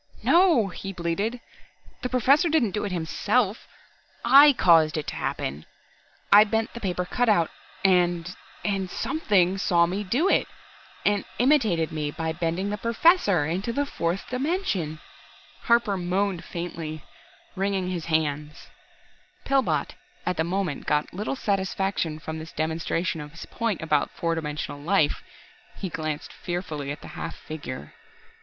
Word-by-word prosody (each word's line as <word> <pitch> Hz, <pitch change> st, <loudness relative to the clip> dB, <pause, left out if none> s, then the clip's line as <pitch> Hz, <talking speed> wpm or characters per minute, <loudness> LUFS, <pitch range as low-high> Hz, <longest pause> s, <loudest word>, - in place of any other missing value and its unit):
"No!" 335 Hz, -, +4 dB
he 195 Hz, +2 st, -6 dB
bleated. 195 Hz, +8 st, -2 dB, 0.6 s
"The 250 Hz, -, -2 dB
Professor 270 Hz, +7 st, +4 dB
didn't 295 Hz, -10 st, +2 dB
do 210 Hz, -, -2 dB
it 200 Hz, -, -3 dB
himself 190 Hz, +6 st, 0 dB, 0.6 s
I 280 Hz, +4 st, +9 dB
caused 165 Hz, -, +4 dB
it 155 Hz, -, -3 dB
to -, -, -6 dB
happen. 70 Hz, +3 st, -3 dB, 0.7 s
I 205 Hz, +1 st, +10 dB
bent 220 Hz, +1 st, -1 dB
the 235 Hz, -, -6 dB
paper 180 Hz, -4 st, -2 dB
cutout, 210 Hz, -6 st, +2 dB, 0.3 s
and 175 Hz, -1 st, +2 dB, 0.3 s
and 195 Hz, -3 st, -1 dB
Something 195 Hz, -, +1 dB
saw 170 Hz, -3 st, +3 dB
me 190 Hz, +4 st, -2 dB
do 250 Hz, -, +1 dB
it, -, -, +3 dB, 0.6 s
and 205 Hz, -1 st, +2 dB
imitated 225 Hz, -, +3 dB
me 150 Hz, -2 st, -2 dB
by 160 Hz, +2 st, -3 dB
bending 175 Hz, +4 st, -2 dB
the 210 Hz, -, -3 dB
Professor 230 Hz, -, +3 dB
into 185 Hz, +9 st, -2 dB
the 285 Hz, +4 st, 0 dB
fourth 175 Hz, -8 st, -2 dB
dimension!" 250 Hz, -, -1 dB, 0.7 s
Harper 235 Hz, -4 st, +3 dB
moaned 185 Hz, 0 st, -1 dB
faintly, 165 Hz, -3 st, -6 dB, 0.5 s
wringing 190 Hz, -1 st, -1 dB
his 175 Hz, -3 st, -4 dB
hands. 150 Hz, -2 st, -2 dB, 0.8 s
Pillbot 270 Hz, -1 st, +1 dB, 0.3 s
at 180 Hz, -, 0 dB
the 160 Hz, -, +1 dB
moment 180 Hz, -3 st, -2 dB
got 150 Hz, 0 st, 0 dB
little 210 Hz, +8 st, -3 dB
satisfaction 195 Hz, -6 st, -1 dB
from 160 Hz, 0 st, -6 dB
this 160 Hz, +1 st, -9 dB
demonstration 160 Hz, +1 st, -1 dB
of 150 Hz, 0 st, -10 dB
his 165 Hz, -, -9 dB
point 225 Hz, -7 st, -2 dB
about 150 Hz, -2 st, +1 dB
four 165 Hz, -1 st, -2 dB
dimensional 150 Hz, -2 st, -4 dB
life. 160 Hz, -2 st, +2 dB, 0.6 s
He 190 Hz, -, -4 dB
glanced 155 Hz, -3 st, -4 dB
fearfully 160 Hz, -6 st, -4 dB
at 145 Hz, -, -7 dB
the -, -, -10 dB
half -, -, -6 dB
figure. 130 Hz, -, -8 dB
180 Hz, 140 wpm, -25 LUFS, 160-215 Hz, 0.8 s, I